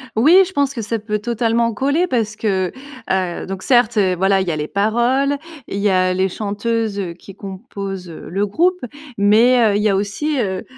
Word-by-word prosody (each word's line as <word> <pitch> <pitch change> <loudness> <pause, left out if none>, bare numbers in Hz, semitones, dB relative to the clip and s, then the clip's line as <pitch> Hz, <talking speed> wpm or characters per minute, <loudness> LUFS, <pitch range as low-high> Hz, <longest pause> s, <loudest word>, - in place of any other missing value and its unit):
Oui, 320 +12 +6
je 380 - -11
pense 285 -3 +1
que 235 - -4
ça 225 +1 -2
peut 210 0 -3
totalement 230 +1 0
coller 285 +10 +1
parce 225 -7 -1
que, 190 -4 -1 0.4
heu, 185 -2 -1
donc 190 0 -6
certes, 240 -3 +3
heu, 185 -3 +3
voilà 195 +2 +2
il 190 - -3
y - - +1
a - - -2
les 150 0 -3
paroles, 240 - +1 0.3
il - - -5
y 205 +1 +2
a 185 -1 +2
les 190 +1 +1
chanteuses, 210 +1 -2
heu, 180 -3 -4
qui 190 +3 -14
composent, 195 -2 -7
heu, 165 - -10
le 200 +4 -1
groupe 360 - +1 0.4
mais, 220 +5 +4
heu, - - 0
il 210 - -1
y 215 - +3
a 195 - +2
aussi, 205 +10 -1
heu, 190 -5 -2
210 Hz, 210 wpm, -19 LUFS, 190-240 Hz, 0.4 s, Oui